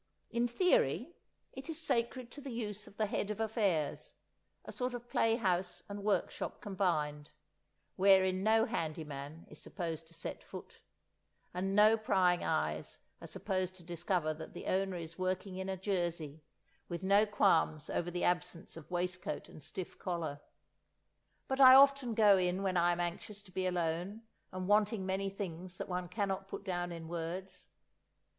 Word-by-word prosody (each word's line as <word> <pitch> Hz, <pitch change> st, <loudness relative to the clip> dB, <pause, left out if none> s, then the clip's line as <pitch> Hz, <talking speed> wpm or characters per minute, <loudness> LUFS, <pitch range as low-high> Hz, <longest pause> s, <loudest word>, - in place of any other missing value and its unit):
In 235 Hz, +1 st, +1 dB
theory, 370 Hz, -, +2 dB, 0.4 s
it 265 Hz, +4 st, -8 dB
is 325 Hz, -1 st, -4 dB
sacred 245 Hz, -4 st, -1 dB
to 290 Hz, -, -9 dB
the 280 Hz, -, -7 dB
use 210 Hz, -4 st, -5 dB
of 200 Hz, -, -16 dB
the 220 Hz, -, +2 dB
Head 205 Hz, 0 st, -2 dB
of 210 Hz, -, -3 dB
Affairs, 205 Hz, -9 st, 0 dB, 0.5 s
a -, -, -7 dB
sort 250 Hz, -1 st, -2 dB
of 240 Hz, 0 st, -8 dB
play 225 Hz, -1 st, +2 dB
house 185 Hz, -5 st, -1 dB
and 200 Hz, 0 st, -6 dB
workshop 205 Hz, -1 st, -1 dB
combined, 155 Hz, -7 st, -1 dB, 0.7 s
wherein 190 Hz, -1 st, +5 dB
no 220 Hz, +2 st, +4 dB
handy 165 Hz, -9 st, -2 dB
man 145 Hz, +2 st, -8 dB
is -, -, -12 dB
supposed 165 Hz, -3 st, -5 dB
to 165 Hz, -, -14 dB
set 165 Hz, -, -6 dB
foot, -, -, -10 dB, 0.7 s
and 190 Hz, +2 st, -1 dB
no 215 Hz, +2 st, +7 dB
prying 185 Hz, -5 st, +2 dB
eyes 80 Hz, -, -1 dB, 0.2 s
are -, -, -8 dB
supposed 185 Hz, -1 st, -2 dB
to 180 Hz, -, -12 dB
discover 170 Hz, -1 st, -1 dB
that 160 Hz, +1 st, -10 dB
the -, -, -7 dB
owner 190 Hz, -1 st, 0 dB
is 165 Hz, +1 st, -8 dB
working 185 Hz, +1 st, -2 dB
in 190 Hz, 0 st, -4 dB
a 190 Hz, -, -2 dB
jersey, 170 Hz, -6 st, -2 dB, 0.5 s
with 175 Hz, +1 st, -4 dB
no 200 Hz, +3 st, +5 dB
qualms 165 Hz, -7 st, +2 dB
over 175 Hz, -, -1 dB
the 175 Hz, 0 st, -3 dB
absence 175 Hz, -1 st, -1 dB
of 165 Hz, -3 st, -11 dB
waistcoat 180 Hz, 0 st, -3 dB
and -, -, -12 dB
stiff 185 Hz, +4 st, -7 dB
collar. 165 Hz, -5 st, -3 dB, 1.1 s
But 265 Hz, +1 st, 0 dB
I 260 Hz, -1 st, +11 dB
often 275 Hz, -3 st, +6 dB
go 205 Hz, -3 st, +6 dB
in 180 Hz, +1 st, 0 dB
when 190 Hz, -2 st, 0 dB
I 175 Hz, 0 st, +4 dB
am 175 Hz, -, -1 dB
anxious 185 Hz, +4 st, -4 dB
to 190 Hz, -, -16 dB
be 185 Hz, +1 st, -1 dB
alone 180 Hz, +4 st, -2 dB, 0.3 s
and 185 Hz, 0 st, -4 dB
wanting 210 Hz, -1 st, +3 dB
many 190 Hz, +1 st, -1 dB
things 185 Hz, -2 st, -6 dB
that -, -, -4 dB
one 180 Hz, -1 st, -3 dB
cannot 195 Hz, -1 st, -2 dB
put -, -, -6 dB
down 175 Hz, -1 st, -2 dB
in 165 Hz, -1 st, -7 dB
words. 175 Hz, +3 st, -5 dB
185 Hz, 170 wpm, -34 LUFS, 175-210 Hz, 1.1 s, I